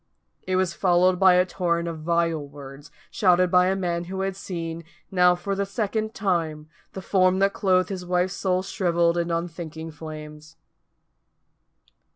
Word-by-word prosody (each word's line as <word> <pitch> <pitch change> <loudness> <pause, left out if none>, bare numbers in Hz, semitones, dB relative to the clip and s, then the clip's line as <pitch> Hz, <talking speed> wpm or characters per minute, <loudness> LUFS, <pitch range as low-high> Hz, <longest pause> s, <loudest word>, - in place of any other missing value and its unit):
It 185 - 0
was 185 -2 +1
followed 180 0 +3
by 190 -2 +6
a 180 0 +4
torrent 170 -2 -1
of 165 -2 -5
vile 165 -1 0
words, 140 0 -11 0.2
shouted 180 -2 +3
by 180 0 +5
a 190 - +1
man 175 -2 -2
who 190 +2 -4
had 195 0 -2
seen, 170 -3 -6 0.3
now 180 -1 +4
for 195 +3 -4
the 200 +1 -1
second 215 +2 -3
time, 165 -6 -1 0.3
the 190 - -7
form 185 -1 +3
that 195 +1 +2
clothed 185 -2 +2
his 190 -2 -5
wife's 180 +1 0
soul 185 -1 0
shrivelled 175 -3 +1
in 170 0 -1
unthinking 165 -1 -4
flames. 155 0 -10
180 Hz, 160 wpm, -24 LUFS, 165-190 Hz, 0.3 s, by